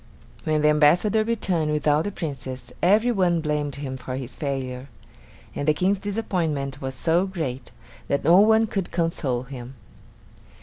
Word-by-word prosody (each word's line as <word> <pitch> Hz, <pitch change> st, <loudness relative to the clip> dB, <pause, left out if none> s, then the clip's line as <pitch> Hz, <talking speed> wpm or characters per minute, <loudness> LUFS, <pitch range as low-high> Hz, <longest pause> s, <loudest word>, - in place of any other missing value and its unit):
When 155 Hz, -1 st, +1 dB
the 150 Hz, -, +5 dB
ambassador 175 Hz, +9 st, +4 dB
returned 185 Hz, -9 st, 0 dB
without 150 Hz, +1 st, +2 dB
the 205 Hz, -, -2 dB
Princess, 135 Hz, -7 st, -6 dB
every 215 Hz, +7 st, +4 dB
one 180 Hz, -6 st, +2 dB
blamed 150 Hz, -2 st, -2 dB
him 135 Hz, -2 st, -5 dB
for 130 Hz, 0 st, -6 dB
his 130 Hz, -1 st, -6 dB
failure; 135 Hz, -2 st, -4 dB, 0.6 s
and 145 Hz, -, -4 dB
the 155 Hz, -, +4 dB
King's 190 Hz, +4 st, +1 dB
disappointment 165 Hz, -10 st, -2 dB
was 130 Hz, -1 st, -4 dB
so 170 Hz, +6 st, +1 dB
great 135 Hz, -9 st, -4 dB, 0.4 s
that 140 Hz, -, 0 dB
no 170 Hz, +4 st, +6 dB
one 220 Hz, +2 st, +5 dB
could 195 Hz, -4 st, -3 dB
console 160 Hz, -7 st, -1 dB
him. 130 Hz, 0 st, -9 dB
150 Hz, 150 wpm, -24 LUFS, 135-185 Hz, 0.6 s, no